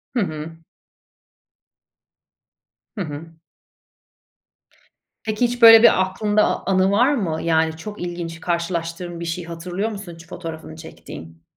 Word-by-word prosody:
Hı - - +2
hı. 160 -4 -4 2.4
Hı 205 - -4
hı. 160 0 -7 1.9
Peki, 215 +2 +1
hiç 245 +1 -3
böyle 225 0 +10
bir 190 - +6
aklında 205 +3 +1
a - - +3
a - - -2
anı 190 +1 +3
var 245 +8 +4
mı? 170 - -2
Yani 160 -1 +1
çok 210 +6 -8
ilginç 170 -1 -5
karşılaştığın 170 0 -3
bir 170 - -5
şeyi 170 +1 -4
hatırlıyor 175 +5 -3
musun 195 -4 -8
hiç 165 0 -14
fotoğrafını 160 -3 -8
çektiğin? 80 - -11
175 Hz, 130 wpm, -21 LUFS, 165-200 Hz, 2.4 s, böyle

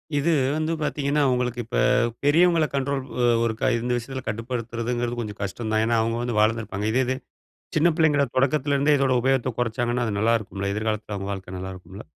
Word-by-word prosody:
இது 145 +4 +2 0.3
வந்து 155 +1 -1
பார்த்தீங்கன்னா, 150 -1 0
உங்களுக்கு 125 -1 -1
இப்ப 120 - -3 0.5
பெரியவங்கள 165 +2 +4
கண்ட்ரோல் 140 0 -1 0.2
ஒ - - +2 0.2
ஒருக்கா 115 +3 0
இந்த 120 +2 -2
விஷயத்தில 130 +2 -5
கட்டுப்படுத்துறதுங்கிறது 120 +1 -3
கொஞ்சம் 105 -3 -7
கஷ்டம் 110 +3 -4
தான். 110 0 +3
ஏன்னா, 115 +1 +1
அவுங்க 115 +1 -1
வந்து 120 -2 -2
வளந்திருப்பாங்க 110 -2 0
இதே 130 +3 +2
இது, 130 +1 -1 0.6
சின்ன 165 +3 +5
பிள்ளைங்கள 150 -4 +3
தொடக்கத்திலருந்தே 140 +2 +2
இதோட 135 -1 +2
உபயோகத்த 130 -1 +1
குறச்சாங்கன்னா, 120 +1 0
அது 105 -2 -2
நல்லா 115 +2 +3
இருக்குமில்ல. 100 -2 -4
எதிர்காலத்தில 110 0 -2
அவுங்க 100 0 -4
வாழ்க்க 95 -1 -7
நல்லா 95 +1 -5
இருக்குமில்ல. 95 +3 -11
120 Hz, 170 wpm, -24 LUFS, 110-135 Hz, 0.6 s, சின்ன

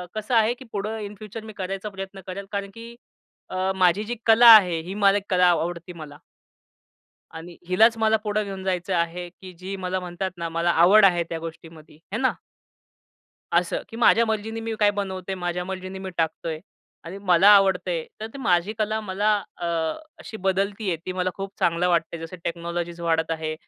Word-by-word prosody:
कसं 215 +3 -2
आहे, 225 +1 +4
की 260 +2 -13
पुढं 215 +2 -3
इन 210 0 -7
फ्युचर 215 +2 -9
मी 220 - -9
करायचा 195 +2 -4
प्रयत्न 195 0 -8
करेल 195 +1 -6
कारण 200 -1 -3
की 230 +1 -11 0.5
अ, 185 +1 -1
माझी 185 +2 +3
जी 235 +3 -4
कला 230 +1 +7
आहे 180 -6 +4
ही 190 - -4
मला 200 -1 +4
एक 200 - -4
कला 180 -2 +4
आवडते 170 +1 -2
मला. 150 -3 -11 1.2
आणि 170 +1 -9
हिलाच 220 +5 +4
मला 220 0 +3
पुढे 210 0 0
घेऊन 195 -1 -7
जायचं 185 0 -1
आहे, 170 +1 -2
की 185 +1 -13
जी 190 +2 -6
मला 185 0 -3
म्हणतात 180 +1 -4
ना 170 -1 -3
मला 165 +1 0
आवड 185 +6 +6
आहे 175 -3 +4
त्या 165 - -4
गोष्टीमध्ये. 160 -2 -11 0.2
हे - - -1
ना? 260 +1 +2 1.2
असं, - - +1
की 225 - -10
माझ्या 230 0 +5
मर्जीनी 220 +1 -3
मी 225 0 -4
काय 205 -1 +5
बनवतोय, 190 -2 -4
माझ्या 180 -1 -3
मर्जींनी 185 0 -6
मी 190 0 -6
टाकतोय 160 0 -2 0.4
आणि 175 +4 -7
मला 185 +1 +5
आवडतंय 190 -4 +2 0.2
तर 220 - -4
ती - - -9
माझी 185 -4 +1
कला 215 0 0
मला 210 +1 +1 0.2
अ, 175 - -6 0.5
अशी 220 - -9
बदलती 195 +2 -1
आहे. 170 - 0
ती 185 - -2
मला 185 0 -1
खूप 195 0 -6
चांगलं 170 +1 +1
वाटतंय. 170 -1 0
जसं 165 +3 -8
टेक्नॉलॉजीज 170 0 -4
वाढत 165 -1 0
आहे. 160 -1 -2
190 Hz, 190 wpm, -24 LUFS, 175-210 Hz, 1.2 s, कला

